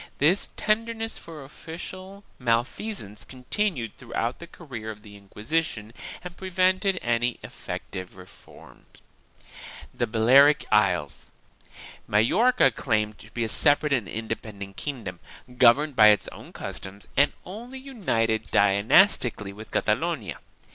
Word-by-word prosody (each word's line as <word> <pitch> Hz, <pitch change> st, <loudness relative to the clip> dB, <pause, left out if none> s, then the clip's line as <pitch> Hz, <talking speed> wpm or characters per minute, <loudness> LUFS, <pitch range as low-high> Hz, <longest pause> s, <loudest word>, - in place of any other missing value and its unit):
This 165 Hz, +8 st, +3 dB
tenderness 225 Hz, +1 st, -1 dB
for 160 Hz, -4 st, -10 dB
official 185 Hz, +7 st, -9 dB, 0.2 s
malfeasance 120 Hz, -, -2 dB
continued 130 Hz, -, -2 dB
throughout 120 Hz, 0 st, -3 dB
the 170 Hz, -, -9 dB
career 125 Hz, -11 st, -8 dB
of 105 Hz, -1 st, -9 dB
the 105 Hz, -2 st, -13 dB
Inquisition 105 Hz, +3 st, -3 dB, 0.3 s
and 180 Hz, -1 st, -8 dB
prevented 185 Hz, +1 st, +1 dB
any 120 Hz, 0 st, 0 dB
effective 90 Hz, 0 st, -7 dB
reform. 90 Hz, 0 st, -16 dB, 1.1 s
THE -, -, -1 dB
BALEARIC 130 Hz, +7 st, +5 dB
ISLES. -, -, +1 dB, 0.8 s
Majorca 210 Hz, -, +4 dB
claimed 105 Hz, -3 st, -1 dB
to 110 Hz, -, -13 dB
be 120 Hz, +1 st, -3 dB
a -, -, 0 dB
separate 145 Hz, +4 st, +3 dB
and 120 Hz, -7 st, 0 dB
independent 110 Hz, -3 st, -6 dB
kingdom, 125 Hz, -10 st, -6 dB, 0.4 s
governed 135 Hz, +4 st, +5 dB
by 110 Hz, -2 st, +8 dB
its 105 Hz, -3 st, +4 dB
own -, -, -12 dB
customs 100 Hz, +1 st, -8 dB
and 145 Hz, +1 st, +4 dB
only 235 Hz, +8 st, -8 dB
united 115 Hz, -, -1 dB
dynastically 100 Hz, -, +3 dB
with 110 Hz, +2 st, -11 dB
Catalonia. -, -, -1 dB
125 Hz, 115 wpm, -26 LUFS, 110-180 Hz, 1.1 s, by